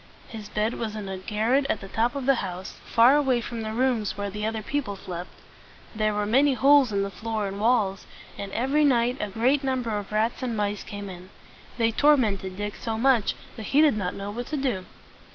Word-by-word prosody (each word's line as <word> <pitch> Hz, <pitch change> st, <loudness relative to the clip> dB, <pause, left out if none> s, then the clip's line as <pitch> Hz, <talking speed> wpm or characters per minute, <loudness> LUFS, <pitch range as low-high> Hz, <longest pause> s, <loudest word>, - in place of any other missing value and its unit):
His 215 Hz, -3 st, -8 dB
bed 215 Hz, +2 st, 0 dB
was 220 Hz, -2 st, -3 dB
in 210 Hz, -2 st, -5 dB
a 190 Hz, -1 st, -5 dB
garret 225 Hz, +8 st, +1 dB
at 215 Hz, -, 0 dB
the 195 Hz, -, -9 dB
top 230 Hz, +7 st, 0 dB
of 275 Hz, -2 st, -3 dB
the 275 Hz, -, +5 dB
house, 185 Hz, 0 st, -6 dB
far 240 Hz, +4 st, +6 dB
away 265 Hz, -4 st, +2 dB
from 235 Hz, -1 st, -5 dB
the 220 Hz, 0 st, -4 dB
rooms 230 Hz, -4 st, 0 dB
where 205 Hz, 0 st, -3 dB
the 210 Hz, +2 st, -3 dB
other 220 Hz, -1 st, -3 dB
people 265 Hz, -5 st, -2 dB
slept. 180 Hz, -2 st, -7 dB, 0.6 s
There 215 Hz, -1 st, 0 dB
were 210 Hz, 0 st, 0 dB
many 265 Hz, +6 st, +3 dB
holes 275 Hz, -2 st, +5 dB
in 200 Hz, -1 st, +1 dB
the 200 Hz, -, -4 dB
floor 220 Hz, 0 st, -3 dB
and 195 Hz, +1 st, -6 dB
walls, 210 Hz, -4 st, +1 dB, 0.3 s
and 200 Hz, -1 st, -6 dB
every 270 Hz, +8 st, +1 dB
night 245 Hz, -2 st, +3 dB
a 210 Hz, -, -2 dB
great 255 Hz, +8 st, +1 dB
number 260 Hz, -3 st, -1 dB
of 205 Hz, 0 st, -5 dB
rats 220 Hz, +2 st, 0 dB
and 240 Hz, -3 st, -2 dB
mice 205 Hz, -1 st, -1 dB
came 205 Hz, -1 st, -7 dB
in. 185 Hz, 0 st, -10 dB, 0.5 s
They 230 Hz, -1 st, +2 dB
tor 295 Hz, +6 st, +5 dB
ment 210 Hz, -7 st, 0 dB
ed 190 Hz, -1 st, -6 dB
Dick 205 Hz, 0 st, -4 dB
so 225 Hz, -2 st, -3 dB
much, 240 Hz, -3 st, +3 dB, 0.2 s
that 220 Hz, -3 st, -7 dB
he -, -, +8 dB
did 305 Hz, -7 st, +5 dB
not 185 Hz, -4 st, -2 dB
know 200 Hz, +1 st, -5 dB
what 240 Hz, +3 st, -5 dB
to 305 Hz, -, -3 dB
do. 245 Hz, -10 st, -1 dB
220 Hz, 225 wpm, -26 LUFS, 205-255 Hz, 0.6 s, he